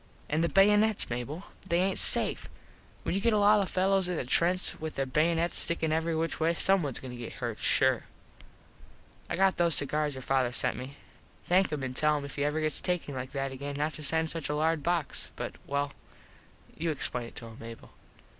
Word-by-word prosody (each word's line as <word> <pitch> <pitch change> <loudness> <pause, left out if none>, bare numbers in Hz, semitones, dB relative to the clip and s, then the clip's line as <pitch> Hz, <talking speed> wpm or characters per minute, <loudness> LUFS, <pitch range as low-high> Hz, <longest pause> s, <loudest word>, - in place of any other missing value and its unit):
An 155 +2 +1
these 170 - 0
baynuts, 210 - +3
Mable. 135 +9 -4 0.3
They 170 - +2
aint 190 +1 +2
safe. - - +6 0.5
When - - -2
you 195 - -1
get 230 +1 +2
a - - +3
lot 210 +1 +5
of 195 - -2
fellos 190 0 +2
in 180 - -2
a - - -3
trench 175 +8 0
with 160 0 -5
there 135 - -1
baynuts 165 +5 +1
stickin 165 -2 0
every 160 +1 0
which 165 +1 -2
way 165 +1 +1
some 195 +2 +3
ones 140 -6 -3
goin 130 - -8
to 125 - -8
get 120 -1 -7
hurt - - -5
sure. - - +2 1.2
I - - -1
got 190 +1 +2
those 170 -2 +3
cigars 150 0 0
your 130 - -8
father 130 -2 +1
sent - - -1
me. 130 +2 -8 0.5
Thank 185 +2 +2
him 150 -3 -3
an 130 -1 -4
tell 150 +3 +2
him 140 - -5
if 140 - -8
he 140 - -1
ever 150 +2 0
gets 155 0 0
takin 180 -5 -2
like 130 0 -6
that 135 -1 -2
again 140 +2 -6
not 150 +2 -1
to - - -8
send 160 +2 0
such 165 -3 -4
a 150 - -1
large 160 +1 +1
box 170 -1 -2
but - - -5
well 140 0 -2 0.8
you 165 +1 -2
explain 125 -5 -2
it - - -15
to 115 - -6
him 115 0 -11
Mable. 115 0 -11
155 Hz, 220 wpm, -29 LUFS, 140-175 Hz, 1.2 s, safe